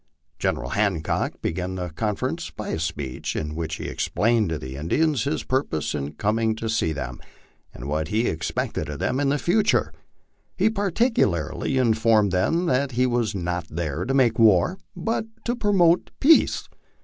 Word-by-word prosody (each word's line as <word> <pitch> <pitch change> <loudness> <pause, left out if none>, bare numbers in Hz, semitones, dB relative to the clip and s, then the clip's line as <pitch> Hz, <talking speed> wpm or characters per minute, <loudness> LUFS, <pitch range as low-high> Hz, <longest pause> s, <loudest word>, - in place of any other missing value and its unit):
General - - -1
Hancock 100 -7 0
began 90 +2 -2
the 90 -1 -4
confer 100 +6 -2
ence - - -5
by - - -7
a 80 - -2
speech, 75 -5 -3
in 75 -1 -3
which 80 0 -3
he - - -7
explained 110 -3 +1
to 80 - -1
the 65 -3 -7
Indians 135 - +1
his 145 +3 -1
purpose 130 - -1
in 75 0 -3
coming 110 +5 0
to 115 0 -4
see 110 -8 +1
them, 65 -5 -5 0.5
and 65 - -8
what 75 +2 -1
he 110 +7 0
expected 80 - -2
of 75 - -5
them 110 - -1
in 140 -1 +2
the 145 - +2
future. 195 - +2 0.6
He 220 - +3
particularly 200 - 0
informed 110 -4 +3
them 165 - +1
that 135 -3 +1
he 125 +2 +2
was 120 -4 0
not 90 -2 -3
there 80 0 -3
to 135 - -1
make 120 -4 +3
war, 110 - +4 0.2
but 225 0 -1 0.2
to 240 - 0
promote 185 -6 +3
peace. 320 +4 +4
110 Hz, 170 wpm, -24 LUFS, -, 0.6 s, war